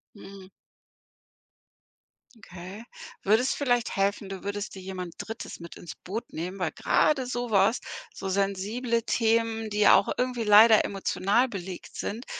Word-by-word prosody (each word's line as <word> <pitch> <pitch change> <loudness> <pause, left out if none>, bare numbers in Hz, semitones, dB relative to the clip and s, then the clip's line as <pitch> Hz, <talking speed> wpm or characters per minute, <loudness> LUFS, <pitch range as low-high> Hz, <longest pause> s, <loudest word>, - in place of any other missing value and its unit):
Mhm. 195 -2 -12 1.9
Okay, 190 +1 -10 0.4
würde 220 +5 +3
es 260 - +1
vielleicht 245 -5 0
helfen, 200 0 0
du 195 -1 -7
würdest 205 +1 -4
dir 190 - -9
jemand 185 -2 -6
Drittes 225 -4 -7
mit 170 0 -10
ins 160 -4 -9
Boot 210 +6 -7
nehmen, 180 +4 -5
weil 180 -4 -1
grade 270 -4 +1
so 245 -2 -3
was 200 +4 +3 0.3
so 195 - -7
sensible 200 +5 -1
Themen, 225 -1 0
die 210 0 -2
ja - - +7
auch - - +2
irgendwie 250 -2 -1
leider 215 +1 +7
emotional 200 +5 +1
belegt 190 -5 -8
sind, 230 +5 -5
205 Hz, 145 wpm, -27 LUFS, 190-230 Hz, 1.9 s, ja